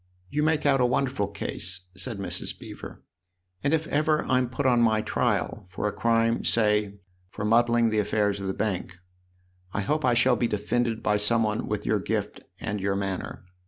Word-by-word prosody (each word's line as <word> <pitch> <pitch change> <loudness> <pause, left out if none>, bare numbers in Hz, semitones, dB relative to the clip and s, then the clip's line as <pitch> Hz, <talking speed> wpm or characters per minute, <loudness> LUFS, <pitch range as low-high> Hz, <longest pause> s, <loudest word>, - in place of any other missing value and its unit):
"You 150 - 0
make 155 -1 +1
out 135 -2 +4
a - - +5
wonderful 125 -4 0
case," 95 -2 -5
said 115 +3 -4
Mrs. 100 - -4
Beever, - - -10 0.3
" 90 0 -41
and 140 - +2
if 160 0 +1
ever 155 +1 +1
I'm 130 -1 +2
put 135 +2 -3
on 125 -2 +4
my 110 -2 +3
trial 90 - -1
for 95 +3 -2
a - - 0
crime 115 +1 +1
say 105 -2 +1 0.3
for 105 - -5
muddling 115 +1 +3
the 110 - +2
affairs 105 -1 0
of 95 - -3
the 95 - -1
Bank 95 -4 -2 0.8
I 100 - 0
hope 150 +9 0
I 125 -2 +3
shall 125 +1 +5
be 120 - +1
defended 115 +2 -1
by 105 - +2
some 115 +2 +2
one 105 -1 -1
with - - -3
your - - +2
gift - - -3 0.2
and 105 -2 -3
your 100 0 0
manner. 95 -2 -4
110 Hz, 195 wpm, -26 LUFS, 100-125 Hz, 0.8 s, a